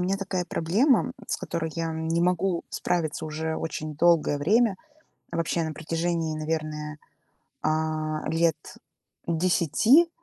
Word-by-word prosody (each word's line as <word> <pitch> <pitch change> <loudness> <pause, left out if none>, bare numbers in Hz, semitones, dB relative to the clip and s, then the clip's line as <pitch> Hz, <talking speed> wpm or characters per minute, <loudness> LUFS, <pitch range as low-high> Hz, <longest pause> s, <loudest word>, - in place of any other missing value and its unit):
меня 185 +2 +1
такая 190 -2 -2
проблема, 200 - +3
м, - - -5
с - - -1
которой 160 -1 -3
я 165 -1 -2
не 160 +1 -1
могу 180 0 +1
справиться 160 -3 -1
уже 160 +1 -3
очень 155 -1 -4
долгое 165 -3 +3
время. 210 +6 +3 0.6
Вообще 165 0 0
на 160 - -3
протяжении, 165 +1 -1
наверное, 155 -1 -3 0.7
а, 155 0 -1 1.0
10 170 - +3
лет 340 - +1
165 Hz, 125 wpm, -26 LUFS, 155-180 Hz, 1.0 s, проблема